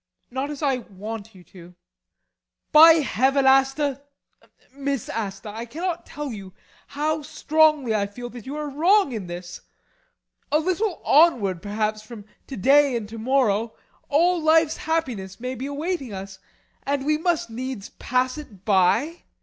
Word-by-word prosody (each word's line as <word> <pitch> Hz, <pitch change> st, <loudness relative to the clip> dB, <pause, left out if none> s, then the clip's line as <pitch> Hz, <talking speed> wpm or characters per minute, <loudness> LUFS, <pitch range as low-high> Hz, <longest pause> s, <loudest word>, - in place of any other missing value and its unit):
Not 265 Hz, +3 st, -3 dB
as 295 Hz, 0 st, -6 dB
I 270 Hz, -3 st, +2 dB
want 220 Hz, -1 st, -8 dB
you 180 Hz, -, -15 dB
to. 185 Hz, -, -17 dB
[More 175 Hz, +1 st, -14 dB, 1.0 s
forcibly.] 320 Hz, +1 st, +9 dB
By -, -, -4 dB
Heaven, 270 Hz, +4 st, +2 dB
Asta 270 Hz, +1 st, +3 dB, 0.7 s
Miss 275 Hz, -3 st, -3 dB
Asta 200 Hz, -2 st, -5 dB
I 225 Hz, +3 st, -6 dB
cannot 345 Hz, +6 st, -4 dB
tell 295 Hz, -2 st, -6 dB
you 195 Hz, -3 st, -10 dB, 0.3 s
how 305 Hz, +2 st, -2 dB
strongly 305 Hz, -4 st, +2 dB
I 200 Hz, -2 st, 0 dB
feel 245 Hz, +4 st, -8 dB
that 240 Hz, -1 st, -11 dB
you 280 Hz, -, -5 dB
are 300 Hz, 0 st, -4 dB
wrong 335 Hz, +4 st, +3 dB
in 215 Hz, -6 st, -5 dB
this! 175 Hz, 0 st, -8 dB, 0.9 s
A 300 Hz, -, +4 dB
little 370 Hz, +4 st, -1 dB
onward, 230 Hz, -, +4 dB
perhaps, 215 Hz, +1 st, -2 dB
from 215 Hz, -1 st, -11 dB, 0.2 s
to 265 Hz, -, -7 dB
day 275 Hz, +5 st, +4 dB
and 215 Hz, -3 st, -6 dB
to 225 Hz, 0 st, -8 dB
morrow, 230 Hz, -3 st, +1 dB, 0.3 s
all 340 Hz, +4 st, +3 dB
life's 320 Hz, 0 st, +3 dB
happiness 245 Hz, -, -3 dB
may 250 Hz, +2 st, -4 dB
be 260 Hz, +2 st, -5 dB
awaiting 285 Hz, -, -3 dB
us. 195 Hz, 0 st, -8 dB, 0.4 s
And 280 Hz, -1 st, -2 dB
we 305 Hz, +1 st, +1 dB
must 330 Hz, -7 st, -1 dB
needs 250 Hz, -3 st, -6 dB
pass 255 Hz, +3 st, -1 dB
it 205 Hz, -10 st, -13 dB
by! 220 Hz, -, +2 dB
265 Hz, 160 wpm, -23 LUFS, 215-300 Hz, 1.0 s, forcibly